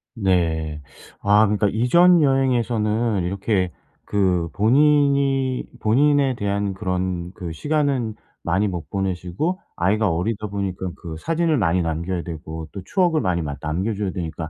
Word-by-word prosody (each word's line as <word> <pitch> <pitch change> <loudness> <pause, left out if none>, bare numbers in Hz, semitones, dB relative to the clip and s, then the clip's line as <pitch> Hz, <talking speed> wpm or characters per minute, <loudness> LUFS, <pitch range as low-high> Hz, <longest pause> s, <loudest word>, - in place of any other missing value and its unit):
네. 80 -7 0 0.4
아 105 +2 +5
그러니까 105 0 +1
이전 170 - +5
여행에서는 120 - +1
이렇게 95 0 -1 0.3
그 90 -5 0
본인이 140 +2 +3 0.2
본인에 135 +3 +3
대한 100 -2 -1
그런 90 -2 -3
그 85 -3 -6
시간은 140 - 0 0.3
많이 95 +5 +1
못 85 -6 -5
보내시고 95 - -2 0.2
아이가 105 +4 +2
어리다 105 +5 -2
보니까 95 -2 -3
그 80 -2 -7
사진을 165 - 0
많이 90 -4 +2
남겨야 85 +2 -2
되고 80 -1 -7
또 100 - -6
추억을 170 - +1
많이 85 -2 0
막 70 -2 -5
남겨 90 +9 -1
줘야 100 -2 -2
되니까 80 -2 -5
100 Hz, 300 characters per minute, -22 LUFS, 90-125 Hz, 0.4 s, 아